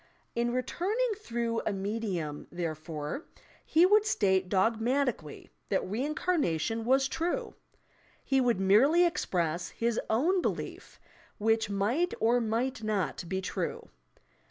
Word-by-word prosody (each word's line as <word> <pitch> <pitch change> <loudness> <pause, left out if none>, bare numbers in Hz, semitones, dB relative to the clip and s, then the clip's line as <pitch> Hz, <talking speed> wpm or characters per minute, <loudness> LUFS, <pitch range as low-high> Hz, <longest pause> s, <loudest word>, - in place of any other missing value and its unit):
In 240 0 0
returning 395 - -1
through 235 - -2
a - - 0
medium, 195 -7 -3
therefore, 160 - -4 0.4
he 330 +3 +4
would 415 +3 +5
state 190 - +1
dogmatically 225 - 0 0.2
that 190 - 0
reincarnation 230 - -1
was 265 +2 +3
true! 335 +5 -2 0.7
He 270 -1 +3
would 240 -5 +2
merely 260 - +5
express 175 - -1
his 235 0 -1
own 330 +12 +2
belief, - - -4 0.4
which 225 0 +1
might 230 - 0
or 235 +2 +3
might 230 +3 -1
not 210 -5 -1
be 190 0 -1
true. 190 - -4
225 Hz, 115 wpm, -30 LUFS, 190-275 Hz, 0.7 s, would